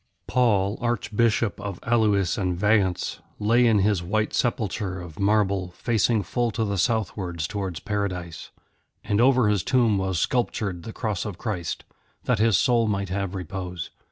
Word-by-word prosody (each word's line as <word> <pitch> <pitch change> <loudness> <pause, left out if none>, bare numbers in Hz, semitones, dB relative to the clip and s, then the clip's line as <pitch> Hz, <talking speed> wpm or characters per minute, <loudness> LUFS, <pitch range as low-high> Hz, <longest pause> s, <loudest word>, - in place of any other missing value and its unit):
Paul, 105 -5 +2
Archbishop 115 -2 0
of 100 -3 -5
Alois 105 -6 +2
and 90 -4 -1
Vayence, 100 -2 +1 0.2
lay 115 +4 +3
in 110 -2 +4
his 100 -2 +2
white 105 +5 -1
sepulchre 105 -5 -1
of 85 -4 -10
marble, 100 -3 +1
facing 115 -2 +1
full 120 +6 -1
to 110 - +1
the 100 -2 -2
southwards 95 -7 -1
towards 95 -3 -4
Paradise. 90 -5 -4 0.5
And 105 +2 +1
over 125 -2 +4
his 105 -3 +2
tomb 115 -4 +2
was 95 -2 -1
sculptured 100 -4 -1
the 110 - -7
Cross 110 -4 -2
of 100 -5 -5
Christ, 95 -7 -4 0.4
that 125 -4 +1
his 110 -4 +4
soul 115 +1 +3
might 100 -2 -1
have 100 0 -2
repose. 90 -2 -5
100 Hz, 155 wpm, -25 LUFS, 95-110 Hz, 0.5 s, in